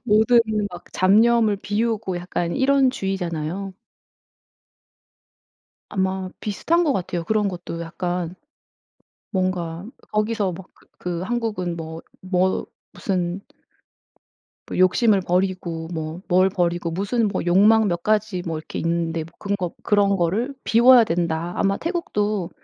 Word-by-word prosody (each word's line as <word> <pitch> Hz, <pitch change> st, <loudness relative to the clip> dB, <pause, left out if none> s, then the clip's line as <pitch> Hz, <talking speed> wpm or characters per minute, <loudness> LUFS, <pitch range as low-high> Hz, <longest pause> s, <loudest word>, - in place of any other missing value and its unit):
모든 235 Hz, +1 st, +5 dB, 0.3 s
막 175 Hz, -2 st, -10 dB
잡념을 220 Hz, +3 st, +4 dB
비우고 210 Hz, -1 st, -1 dB
약간 175 Hz, -1 st, -3 dB
이런 270 Hz, 0 st, +4 dB
주의잖아요. 190 Hz, -, -3 dB, 2.2 s
아마 190 Hz, -1 st, -1 dB
비슷한 325 Hz, -, +1 dB
것 295 Hz, -4 st, +2 dB
같아요. 175 Hz, -5 st, -2 dB
그런 210 Hz, +2 st, +1 dB
것도 175 Hz, -2 st, -6 dB
약간 175 Hz, +1 st, -3 dB, 1.0 s
뭔가 185 Hz, -2 st, -2 dB, 0.3 s
거기서 210 Hz, -3 st, 0 dB
막 185 Hz, +2 st, -11 dB
그 -, -, -26 dB
그 175 Hz, -1 st, -4 dB
한국은 210 Hz, -5 st, -2 dB
뭐 160 Hz, 0 st, -7 dB, 0.2 s
뭐 185 Hz, 0 st, 0 dB, 0.3 s
무슨 180 Hz, -1 st, -2 dB, 1.3 s
뭐 -, -, -5 dB
욕심을 195 Hz, +3 st, +4 dB
버리고 180 Hz, -3 st, -1 dB
뭐 160 Hz, +1 st, -5 dB
뭘 185 Hz, +1 st, +4 dB
버리고 175 Hz, -2 st, -1 dB
무슨 205 Hz, +6 st, 0 dB
뭐 200 Hz, -, -2 dB
욕망 210 Hz, +5 st, +5 dB
몇 175 Hz, -2 st, -2 dB
가지 215 Hz, -3 st, +1 dB
뭐 165 Hz, -2 st, -2 dB
이렇게 155 Hz, -, -6 dB
있는데 165 Hz, -1 st, -1 dB, 0.2 s
그런 200 Hz, 0 st, -1 dB
거 180 Hz, -3 st, -3 dB
"그런 200 Hz, -1 st, +3 dB
거를 195 Hz, +10 st, 0 dB
비워야 240 Hz, +1 st, +7 dB
된다." 170 Hz, -2 st, -1 dB
아마 195 Hz, 0 st, +1 dB
태국도 210 Hz, -, -2 dB
190 Hz, 245 characters per minute, -22 LUFS, 175-215 Hz, 2.2 s, 비워야